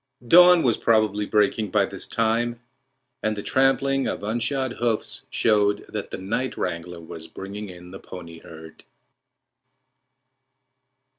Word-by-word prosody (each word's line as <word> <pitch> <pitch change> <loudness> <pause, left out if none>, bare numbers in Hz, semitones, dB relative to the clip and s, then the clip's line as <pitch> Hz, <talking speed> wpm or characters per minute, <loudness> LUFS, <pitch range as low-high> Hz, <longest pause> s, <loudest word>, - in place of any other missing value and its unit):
Dawn 175 +3 +8
was 120 -4 +2
probably 105 -2 +2
breaking 105 0 +1
by - - +2
this - - -6
time, 115 +1 0 0.6
and 110 -1 -1
the 100 - -5
trampling 135 +1 +2
of - - -4
unshod 120 +5 -1
hoofs 115 -2 -1
showed 105 -2 +2
that 105 -2 -5
the - - -5
night 115 +8 -3
wrangler 85 +1 -4
was 80 0 -9
bringing 100 +1 -8
in 90 0 -12
the 95 - -9
pony 85 -3 -10
herd. 80 0 -13
105 Hz, 130 wpm, -24 LUFS, 95-120 Hz, 0.6 s, Dawn